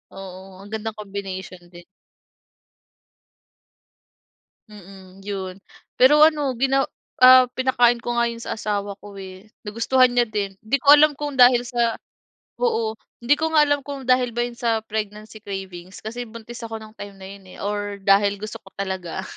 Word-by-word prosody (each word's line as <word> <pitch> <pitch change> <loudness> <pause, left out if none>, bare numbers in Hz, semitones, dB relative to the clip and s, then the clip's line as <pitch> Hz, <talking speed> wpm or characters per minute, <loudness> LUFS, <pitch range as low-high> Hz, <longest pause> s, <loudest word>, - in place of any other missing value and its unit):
Oo, 190 0 -11
ang 205 - -14
gandang 220 0 -4
combination 195 -3 -7
din. 175 0 -14 2.9
Mm, 195 -2 -14
'yon 190 -2 -5 0.4
pero 295 +4 +6
ano 300 -4 +4
gina 270 +2 +1 0.4
ah, 255 0 +9
pinakain 245 -2 +3
ko 240 - -3
nga 235 - +3
'yon 230 0 -8
sa - - -5
asawa 205 -1 -3
ko, 205 0 -13
eh, 190 +2 -11 0.2
nagustuhan 245 +4 +3
niya 245 -1 +3
din 200 -2 -3
hindi 220 +6 0
ko 280 +2 +7
alam 295 -1 +5
kung 295 -1 -4
dahil 245 -1 +6
sa 235 -1 -1 0.6
oo, 230 - 0 0.3
hindi 240 +5 +3
ko 320 0 -1
nga 305 -1 +6
alam 290 -1 0
kung 280 -2 -7
dahil 255 0 +3
ba 240 0 0
'yon 240 -1 -9
sa 225 -2 0
pregnancy 215 0 -6
cravings 190 -3 -8
kasi 235 +3 -5
buntis 230 +1 -10
ako 225 0 -6
nung 215 0 -13
time 200 -1 -9
na 190 0 -10
'yon, 200 -1 -12
eh, - - -13
or 205 0 -3
dahil 200 +1 +3
gusto 215 +1 -7
ko 195 - -15
talaga, 190 -3 -4
215 Hz, 165 wpm, -22 LUFS, 195-250 Hz, 2.9 s, ah